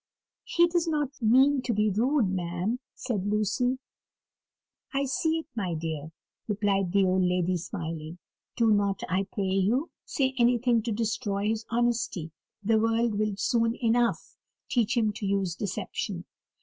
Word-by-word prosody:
"He 345 - +4
does 340 0 0
not 295 -4 -2
mean 260 +5 +5
to 250 -2 -1
be 210 0 +2
rude, 240 +4 +2
ma'am," 185 +5 -2 0.2
said 210 -7 -2
Lucy. 215 +5 +1 1.2
"I 275 0 +2
see 320 +4 0
it, 320 - -5
my 185 -6 -2
dear," 160 -1 -4 0.4
replied 200 -3 +1
the 195 0 +4
old 185 0 +2
lady, 180 0 +1
smiling. 165 -2 -5 0.4
"Do 230 -2 +3
not, 200 -2 +1
I 190 +1 0
pray 200 - -2
you, 195 - +1
say 265 -2 0
anything 240 -1 +3
to 235 - -1
destroy 210 -2 -1
his 220 0 -2
honesty 235 -8 0 0.3
the 220 +2 +3
world 225 -1 +1
will 215 -1 0
soon 230 +1 +1
enough 235 0 0 0.3
teach 240 0 +1
him 215 -2 +2
to 205 - -5
use 195 -3 0
deception." 190 -1 -4
215 Hz, 150 wpm, -28 LUFS, 190-240 Hz, 1.2 s, mean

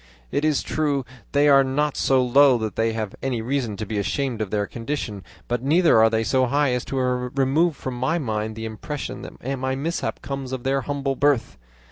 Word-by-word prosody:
It 145 - 0
is 155 -2 +2
true 145 -4 -1 0.3
they 145 +1 +4
are 140 -1 +7
not 140 +2 0
so 130 -1 +3
low 135 +1 +5
that 110 -2 -4
they 115 0 +1
have 110 -3 -3
any 130 -2 -1
reason 120 -3 -2
to 110 - -4
be 105 0 -2
ashamed 125 +2 -1
of 105 - -2
their 105 0 0
condition, 115 -4 -5 0.2
but 120 0 -1
neither 160 -1 +4
are 110 0 +6
they 110 0 +1
so 130 +3 +2
high 140 +1 +2
as 125 -1 -1
to - - -5
remove 130 +5 +1
from 130 - -5
my 135 +7 +1
mind 110 -6 -2
the 110 0 -5
impression 110 +7 -5
that 135 +1 -6
my 130 0 -1
mishap 160 +6 -3
comes 135 -2 -5
of 130 -2 -4
their 135 +1 +1
humble 140 0 -2
birth. 140 -3 +1
130 Hz, 205 wpm, -23 LUFS, 115-140 Hz, 0.3 s, are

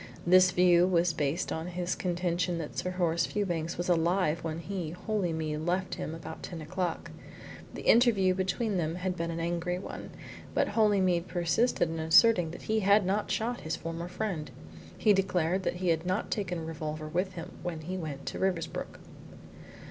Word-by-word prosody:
This 185 +1 +7
view 180 -1 +5
was 175 -2 +2
based 155 +3 -1
on 160 +1 -3
his 180 0 -2
contention 175 -1 -1
that 160 -3 -6
Sir 180 - -2
Horace 175 -2 +1
Fewbanks 175 -5 -2
was 175 - -2
alive 170 -1 +2
when 160 -1 -3
he 175 -1 -4 0.2
(Holymead) 160 -8 -1
left 180 +2 -1
him 175 -3 -4
about 165 - -8
ten 170 - -6
o'clock. 175 +2 -3 0.6
The - - -6
interview 215 -6 +5
between 190 +3 -1
them 165 -1 -1
had 180 0 -2
been 170 -1 -3
an 165 0 -3
angry 175 +1 -1
one, 185 - -7 0.5
but - - +2
Holymead 190 -5 +2
persisted 175 +5 +1
in 165 - -4
asserting 175 +2 +5
that 165 - -9
he 220 0 +1
had 200 0 +4
not 200 +3 0
shot 240 +2 -1
his 160 +1 -2
former 165 +1 -5
friend. 180 -6 -3 0.5
He 210 - +4
declared 185 -2 +1
that 185 - -1
he 180 0 -1
had 165 -1 +1
not 185 +4 -2
taken 185 -4 -1
a 165 - -5
revolver 155 -1 -5
with 180 +4 -1
him 170 -2 -8
when 170 -3 -4
he 180 +4 -5
went 155 -6 -5
to - - -4
Riversbrook. 180 -4 -2
175 Hz, 180 wpm, -30 LUFS, 165-185 Hz, 0.6 s, This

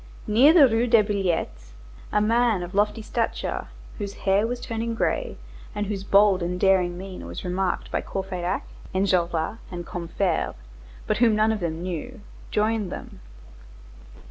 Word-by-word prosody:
Near 245 +7 +6
the 315 -5 +8
Rue 230 +1 +1
des 230 -2 +5
Billettes, 175 - -2 0.4
a 210 - +2
man 225 -3 +2
of 175 +2 -8
lofty 210 +2 +1
stature, 230 +1 -2 0.3
whose 200 -1 -4
hair 200 +3 +3
was 245 +1 -3
turning 230 -1 -3
gray, - - -1 0.4
and 205 0 -1
whose 200 -1 -4
bold 200 -1 +4
and 180 +1 -2
daring 180 -2 +3
mien 185 - -8
was 85 - -7
remarked 180 +1 -1
by - - 0
Courfeyrac, 185 -1 -3 0.3
Enjolras, 180 0 +1
and 175 -1 -6
Combeferre, 175 0 -2 0.5
but - - 0
whom 230 -3 +4
none 215 +1 +3
of 220 - -1
them 170 -2 -3
knew, 185 +7 -5 0.3
joined 215 -2 0
them. - - -8
200 Hz, 150 wpm, -25 LUFS, 180-225 Hz, 0.5 s, the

